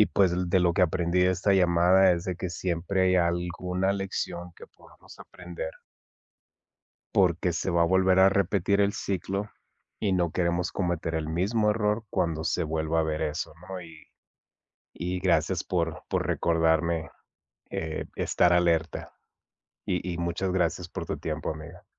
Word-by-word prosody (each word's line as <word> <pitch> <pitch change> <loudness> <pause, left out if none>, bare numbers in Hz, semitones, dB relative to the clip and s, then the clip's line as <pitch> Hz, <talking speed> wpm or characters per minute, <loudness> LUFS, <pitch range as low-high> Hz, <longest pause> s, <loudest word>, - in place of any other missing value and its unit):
y 105 - +6
pues 95 -3 +2 0.2
de 95 +1 +3
lo 85 -1 +3
que 90 - +2
aprendí 85 +1 +1
de 90 0 +4
esta 95 +2 +1
llamada 90 +1 +5
es 85 -1 -2
de 90 -2 -3
que 90 - -4
siempre 90 +1 -1
hay 95 0 +3
alguna 90 +2 0
lección 90 -3 -4
que - - -11
podamos - - -18
aprender 85 -2 -7 1.4
porque 90 -1 +2
se 95 - -2
va 85 0 +3
a - - +4
volver 95 +1 +3
a 95 +1 +7
repetir 100 0 +1
el 100 0 +3
ciclo, 100 +2 -3 0.5
y 100 -3 +1
no 90 -3 +1
queremos 85 0 0
cometer 85 -3 -2
el 80 -1 -2
mismo 105 +6 +1
error 105 +1 0
cuando 80 -1 -1
se 90 - 0
vuelva 80 +1 0
a - - +2
ver 80 0 -2
eso, 75 0 -3 0.2
¿no?, 95 -1 -5
y 80 -2 -14 0.9
y 90 +1 -3
gracias 90 -2 +1
por 85 -3 -2
por - - 0
recordarme, 80 -1 +1 0.6
eh, 80 -1 -4
estar 90 0 +2
alerta, 85 -2 +1 0.7
y 90 0 -2
y 85 - -5
muchas 85 +2 -2
gracias 90 -1 -1
por - - -5
tu - - -3
tiempo, - - -3
amiga. 80 +3 -10
90 Hz, 160 wpm, -27 LUFS, 85-95 Hz, 1.4 s, a